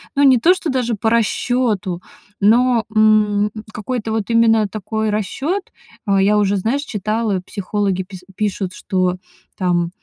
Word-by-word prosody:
ну 285 - +2
не 260 -3 +6
то 340 +10 +5
что 355 -3 -4
даже 250 -3 0
по 220 +2 0
расчёту, 225 -5 0 0.4
но, 235 +3 +3
м, 210 -1 +3 0.2
какой-то 220 0 -4
вот 220 -1 -2
именно 225 -2 +4
такой 220 +2 -3
расчёт 275 - -2 0.4
э, 195 -1 +3
я 210 +2 +3
уже, 200 -1 +2
знаешь, 230 +9 -1
читала, 215 -3 -2
психологи 195 -1 -2
пис 185 -1 -12
пишут, 195 -3 -2
что, 185 -2 -1 0.4
там, 175 -2 0
215 Hz, 145 wpm, -19 LUFS, 195-230 Hz, 0.4 s, не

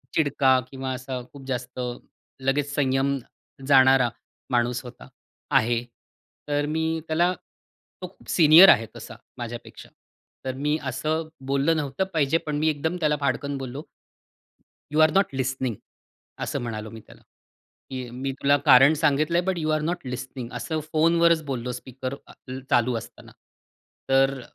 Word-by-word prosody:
चिडका 140 -3 +3
किंवा 135 -1 -4
असा 130 0 -5
खूप 140 -2 -12
जास्त 125 -1 -4 0.6
लगेच 145 +2 0
संयम 135 0 +1 0.5
जाणारा 130 -2 +6 0.4
माणूस 120 0 +1
होता 125 -1 -12 0.4
आहे. 120 +1 +2 0.6
तर 145 0 0
मी 160 +1 -1
त्याला 175 +3 +2 0.7
तो 180 - -4
खूप 180 - -19
सीनियर 165 +3 +8
आहे 115 - +5
तसा - - -9 0.2
माझ्यापेक्षा. - - -8 0.6
तर 130 - -2
मी 150 +3 0
असं 155 +5 -2 0.2
बोललं 140 +4 +2
नव्हतं 145 +4 -1
पाहिजे. 155 0 +2
पण 150 -2 -4
मी 155 +2 +1
एकदम 160 +3 -2
त्याला 150 -2 +2
फाडकन 140 0 -1
बोललो. 135 +2 -6 1.1
"You 155 - +2
R 155 0 +6
not 195 +3 +4
listening." 130 -2 -2 0.7
असं - - -3
म्हणालो 110 -2 -5
मी 115 0 -10
त्याला, - - -17 0.7
की 130 -2 -5
"मी 135 +2 -4
तुला 140 +1 +5
कारण 135 +2 +7
सांगितलंय" 155 +3 +2
"but 185 - 0
you 155 -1 -2
R 155 - -2
not 175 -5 -5
listening." 125 -1 -6
असं 160 -1 -3
फोनवरच 165 +1 +4
बोललो 125 -3 -4
स्पीकर 130 +1 -6
अ, - - -14 0.4
चालू 120 +1 +3
असताना. - - -13 0.8
तर 135 0 +3
140 Hz, 140 wpm, -25 LUFS, 130-155 Hz, 1.1 s, सीनियर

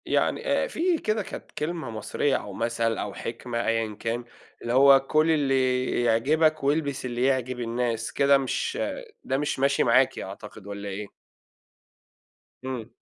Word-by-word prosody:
يعني - - +1
آآ - - +2
في 350 -5 +1
كده 215 -6 -1
كانت - - -9
كلمة 155 -3 -4
مصرية 115 +5 -1
أو 100 - -4
مثّل 115 +1 -1
أو 100 - -4
حكمة 115 +2 -4
أيًا 115 -2 0
كان، 120 +1 -2 0.4
اللي 120 - -2
هو 135 +1 +7
كُل 155 +1 +3
اللي 130 -4 +1
يعجبك 150 +7 +2
والبس 140 -2 0
اللي 120 0 -2
يعجب 130 -2 0
الناس، 115 -1 -2
كده 140 0 +4
مش 135 -1 -2 0.5
ده 135 - -1
مش 145 -1 -2
ماشي 140 +1 +3
معاكِ 125 +2 +3
أعتقد، 100 +1 -9
والّا 100 0 -6
إيه؟ 100 +1 -5 1.6
إمم. 125 -3 -5
125 Hz, 145 wpm, -26 LUFS, 115-140 Hz, 1.6 s, هو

